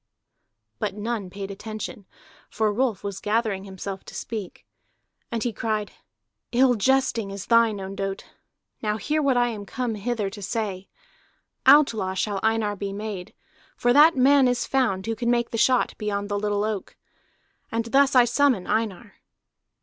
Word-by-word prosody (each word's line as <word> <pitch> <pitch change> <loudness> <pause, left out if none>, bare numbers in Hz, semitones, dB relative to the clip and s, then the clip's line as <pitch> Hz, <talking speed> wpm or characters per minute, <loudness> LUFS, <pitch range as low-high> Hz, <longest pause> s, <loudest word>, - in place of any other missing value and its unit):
But - - -2
none 210 -2 -3
paid 195 +1 -6
attention, 215 0 -7 0.4
for 215 -1 0
Rolf 240 -3 0
was 200 -1 -4
gathering 210 -2 -1
himself 190 0 -7
to - - -11
speak. 215 -5 -6 0.7
And 230 -1 -1
he 240 - -1
cried: 215 0 -2 0.6
"Ill 250 +1 +4
jesting 235 -2 +1
is 200 0 -6
thine, 230 -3 +3
Ondott! 195 0 -4 0.6
Now 210 -1 -1
hear 300 +9 0
what 275 -3 +2
I 240 0 +3
am 215 -3 -6
come 240 +3 -3
hither 215 0 -2
to 205 - -9
say: 195 -2 -3 0.8
Outlaw 220 -10 +5
shall 200 +1 -1
Einar 220 -2 +1
be 200 0 -4
made, 200 -3 -6 0.4
for 245 0 +3
that 305 +4 +7
man 270 +1 +5
is 245 -1 0
found 235 -9 0
who 225 0 -2
can 235 +2 -1
make 235 -1 +1
the 230 - -2
shot 255 +1 +3
beyond 205 -1 -2
the 205 0 -1
little 205 0 0
oak. 215 -2 -4 0.7
And 230 0 -1
thus 270 +3 +3
I 250 -1 +7
summon 245 -5 +2
Einar." 210 -2 -2
215 Hz, 155 wpm, -25 LUFS, 200-240 Hz, 0.8 s, that